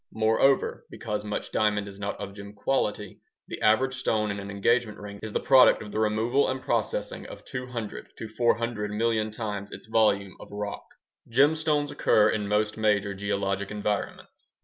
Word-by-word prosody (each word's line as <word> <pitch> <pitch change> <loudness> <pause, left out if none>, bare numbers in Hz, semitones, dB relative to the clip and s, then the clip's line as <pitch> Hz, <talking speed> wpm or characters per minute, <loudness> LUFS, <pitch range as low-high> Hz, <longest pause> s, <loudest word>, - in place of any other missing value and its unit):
Moreover, 110 +5 +2
because 105 -2 -4
much 105 0 -4
diamond 105 -1 +1
is 100 0 -10
not 100 0 -4
of 100 -1 -6
gem 100 0 -10
quality, 105 -3 -1 0.3
the - - -7
average 130 +5 +3
stone 110 -5 0
in 100 - -4
an 100 0 -7
engagement 105 +2 +1
ring 100 -1 -9
is 110 - -5
the - - 0
product 130 -4 +6
of 105 - -9
the 110 - -2
removal 110 +5 +2
and 130 0 -2
processing - - -2
of - - -11
200 125 -4 -6
to 115 - -6
400 115 -1 0
million 110 0 0
times 105 -2 -5
its - - -10
volume 105 -3 +2
of - - -11
rock. 105 0 -5 0.5
Gemstones 145 +2 +3
occur 105 -5 +4
in 105 -2 -2
most 105 +1 0
major 105 -2 +1
geologic 100 0 -2
environments. 105 0 -4
105 Hz, 170 wpm, -27 LUFS, 100-115 Hz, 0.5 s, product